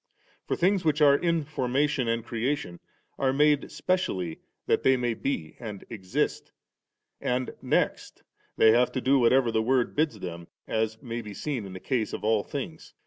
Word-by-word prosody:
For - - 0
things 185 +1 +2
which 155 -1 +2
are 145 -2 +7
in 170 +1 +1
formation 140 -1 0
and 115 0 -1
creation 120 -5 -2 0.4
are 135 -1 +2
made 145 +1 +3
specially 95 - -1 0.3
that - - +2
they 130 0 +4
may 120 -2 0
be 100 - -3
and 105 -5 -7
exist 95 -5 -2 0.4
», - - -55
and 125 +1 -1
next - - -1 0.3
they 110 - +7
have 120 +2 +3
to 130 - -1
do 135 +2 +4
whatever 125 0 +4
the 110 - +1
Word 125 +1 +1
bids 150 -7 +1
them, 85 -2 -7 0.2
as 110 0 -1
may 120 -1 -4
be 105 -2 -9
seen 130 -5 -3
in 95 - -9
the 95 - -7
case 120 -2 -1
of - - -5
all 110 -1 +2
things. 155 +3 -7
125 Hz, 180 wpm, -27 LUFS, 110-145 Hz, 0.4 s, are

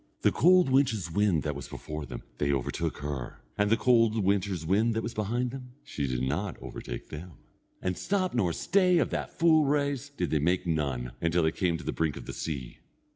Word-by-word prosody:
The - - +4
cold 180 0 +5
winter's 110 - +2
wind 95 -4 +2
that 75 - -1
was 70 - -7
before 75 -1 -6
them, 60 -2 -7 0.2
they 70 -1 +2
overtook 65 -3 -2
her, 70 -5 -5
and 105 0 +1
the 115 - +4
cold 115 -3 +3
winter's 95 -3 0
wind 110 +6 +2
that 110 - -1
was 115 - -4
behind 120 +4 -1
them, 125 -1 -9
she 70 -2 -3
did 65 -1 -1
not 85 +8 -2
overtake - - -7
them. 85 +3 -8 0.5
And 90 -1 0
stop 185 - -1
nor 100 -8 +2
stay 180 - +3
of - - +1
that - - -4
full 160 -2 +5
race, 145 -1 0
did 145 - -3
they 75 - +2
make 90 +6 +1
none, 70 -7 -1
until 85 +1 +2
they 80 - +3
came 85 0 0
to 85 - -10
the - - -2
brink 80 -3 -1
of - - -8
the - - -6
sea. 70 -6 -5
95 Hz, 210 wpm, -29 LUFS, 75-125 Hz, 0.5 s, cold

